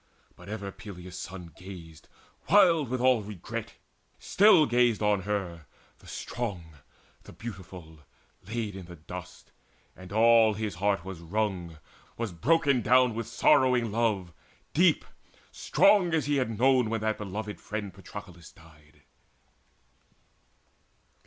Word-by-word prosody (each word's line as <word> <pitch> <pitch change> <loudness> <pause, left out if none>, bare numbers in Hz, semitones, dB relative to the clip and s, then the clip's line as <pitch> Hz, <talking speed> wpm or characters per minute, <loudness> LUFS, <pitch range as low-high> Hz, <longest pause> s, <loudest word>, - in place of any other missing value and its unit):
But 90 +2 -13
ever 100 -2 -5
Peleus' 95 -2 -10
son 90 -3 -8
Gazed, 85 -4 -12 0.4
wild 165 - +5
with 130 0 -2
all 130 -3 +4
regret, 100 -4 -7 0.4
still 190 -6 +5
gazed 120 -3 +2
on 105 -2 +2
her, 90 -5 -4 0.3
The - - -18
strong, 90 -10 -6 0.4
the - - -14
beautiful, 90 -7 -10 0.5
laid 110 -2 -4
in 95 -3 -9
the 90 - -10
dust; 90 +3 -10 0.4
And 95 0 -12
all 110 0 +5
his 105 -1 -3
heart 100 0 -1
was 95 -3 -7
wrung, 90 -2 -3 0.4
was 115 -3 -3
broken 140 - +2
down 125 +1 +4
With 115 +1 -4
sorrowing 120 0 +3
love, 105 -6 -1 0.4
deep, 175 0 +3 0.5
strong 200 - +3
as 155 - 0
he 145 0 +1
had 115 -5 -1
known 130 -1 +3
When 115 -1 -2
that 110 -1 -1
beloved 105 +1 -6
friend 105 -3 -5
Patroclus 85 0 -11
died. 75 -2 -21
105 Hz, 125 wpm, -28 LUFS, 90-120 Hz, 0.5 s, wild